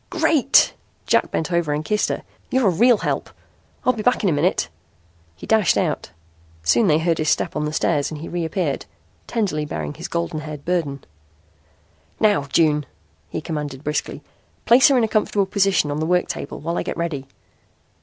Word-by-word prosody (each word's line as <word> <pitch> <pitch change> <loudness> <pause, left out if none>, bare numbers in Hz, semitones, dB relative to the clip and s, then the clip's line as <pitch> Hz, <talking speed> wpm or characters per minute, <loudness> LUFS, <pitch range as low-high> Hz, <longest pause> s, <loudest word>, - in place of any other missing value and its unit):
"Great!" 320 -6 +4 0.3
Jack - - +2
bent 160 - -2
over 170 -4 +1
and 150 +1 -3
kissed 210 +5 +1
her. - - -3 0.3
"You're 260 -2 +2
a - - +2
real 235 +7 +4
help. - - -2 0.6
I'll 255 - +4
be 225 - -5
back 245 +1 +2
in 195 - +3
a - - +2
minute." 160 +6 +1 0.7
He - - -10
dashed 220 -6 +3
out. - - -1 0.5
Soon 200 - +3
they 155 -3 +4
heard 165 0 0
his 155 -1 +1
step - - 0
on 150 0 -1
the 150 - -2
stairs 145 -2 0
and 155 - -7
he 165 - -7
reappeared, 170 -3 -2 0.4
tenderly 200 -10 -1
bearing 75 - -4
his - - -7
golden 85 - -2
haired 150 -2 -8
burden. 160 -6 -1 1.2
"Now, 205 -10 +3
June," 150 0 +2 0.4
he - - -4
commanded 150 -4 -5
briskly, 150 0 -3 0.4
"place 250 +6 +7
her 275 -3 +4
in 240 - +3
a - - +2
comfortable 210 -2 +1
position 195 -6 +1
on 145 - -2
the 160 - -1
work 180 0 +2
table - - -5
while 170 +2 -2
I - - 0
get - - -4
ready." 155 -6 -3
165 Hz, 185 wpm, -21 LUFS, 150-210 Hz, 1.2 s, place